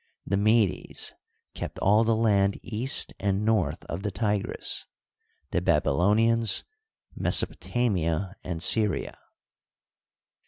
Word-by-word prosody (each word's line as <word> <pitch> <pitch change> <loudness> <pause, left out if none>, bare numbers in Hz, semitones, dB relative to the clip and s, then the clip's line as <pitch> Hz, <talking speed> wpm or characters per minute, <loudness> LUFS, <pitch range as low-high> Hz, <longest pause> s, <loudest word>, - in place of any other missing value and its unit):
The 100 - 0
Medes 105 0 +1 0.4
kept - - -6
all 105 +3 +4
the 115 0 +2
land 100 -3 +2
east 120 +4 0
and 100 +1 0
north 110 -5 0
of 85 - -5
the 105 - -2
Tigris, 105 +1 -2 0.6
the - - 0
Baby - - +2
lonians 110 +8 +2 0.5
Mesopotamia 95 -6 0
and 85 -2 -4
Syria. 105 -1 +1
105 Hz, 105 wpm, -26 LUFS, 95-110 Hz, 0.6 s, all